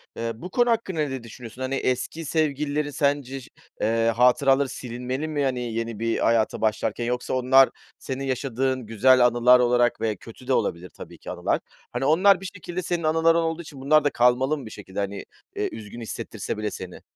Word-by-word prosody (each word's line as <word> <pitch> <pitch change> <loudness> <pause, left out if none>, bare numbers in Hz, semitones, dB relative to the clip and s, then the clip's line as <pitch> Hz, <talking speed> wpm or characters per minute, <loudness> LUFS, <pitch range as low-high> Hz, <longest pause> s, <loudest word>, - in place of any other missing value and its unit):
eee, 115 0 -3
bu 180 +11 -8
konu 240 +4 +2
hakkında 205 -8 0
ne 135 -4 -3
düşünüyorsun? 115 +1 -10
Hani, 130 +1 -1
eski 130 +6 -2
sevgililerin 150 -1 0
sence 140 -2 -1
ş - - -15 0.3
eee, 115 +1 +2
hatıraları 135 +2 +4
silinmeli 125 +4 -4
mi, 145 -2 -1
hani, 130 -2 0
yeni 115 -1 -3
bir 115 0 0
hayata 115 -1 +1
başlarken 110 +2 0
yoksa 125 +1 -2
onlar 130 +1 +5 0.3
senin 135 0 -5
yaşadığın 130 -1 -1
güzel 125 +3 +4
anılar 125 +1 +5
olarak 120 -1 +2
ve 110 -2 0
kötü 115 +5 -14
de 135 - +2
olabilir 90 -4 -1
tabii - - -12
ki - - -8
anılar. - - -1 0.3
Hani, 135 - -2
onlar 185 +5 +5
bir - - -8
şekilde 185 0 -6
senin 170 -1 -2
anıların 165 +1 +3
olduğu 165 0 -1
için 140 -4 -11
bunlar 155 +2 +4
da 145 - +3
kalmalı 125 +5 +2
mı 140 - -9
bir 110 - -9
şekilde, 95 -1 -8
hani, 100 0 -3 0.3
eee, - - -1
üzgün 110 +2 -9
hissettirse 115 - -5
bile 105 -1 -2
seni. 90 -1 -8
130 Hz, 190 wpm, -24 LUFS, 115-150 Hz, 0.3 s, onlar